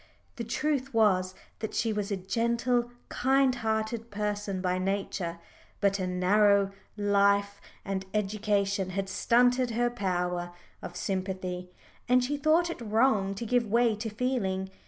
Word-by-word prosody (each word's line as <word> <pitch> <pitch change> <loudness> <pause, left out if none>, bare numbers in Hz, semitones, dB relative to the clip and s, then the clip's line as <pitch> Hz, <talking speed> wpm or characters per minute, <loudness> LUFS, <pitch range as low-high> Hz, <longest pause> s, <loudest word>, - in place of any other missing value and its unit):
The 235 - -3
truth 270 +2 -1
was 185 -4 +3 0.2
that 220 - -4
she 225 -2 +1
was 210 -1 -2
a 200 - 0
gentle, 235 +5 0 0.2
kind 265 +1 +3
hearted 225 0 -2
person 205 -1 -2
by 185 0 0
nature, 190 -3 -2 0.4
but 200 0 +2
a 185 - -1
narrow 200 +2 +3 0.3
life 200 0 +2 0.2
and 195 -1 -2
education 200 -2 0
had 195 0 -1
stunted 245 +5 +3
her 240 +1 0
power 180 -4 -2 0.3
of 175 - -8
sympathy, 185 -1 -3 0.4
and 250 0 +5
she 280 +4 -1
thought 315 +4 +2
it 335 - -8
wrong 215 -3 +2
to 230 - -5
give 240 0 +1
way 230 +1 +3
to 220 +1 -4
feeling. 205 -5 -1
205 Hz, 140 wpm, -29 LUFS, 195-235 Hz, 0.4 s, and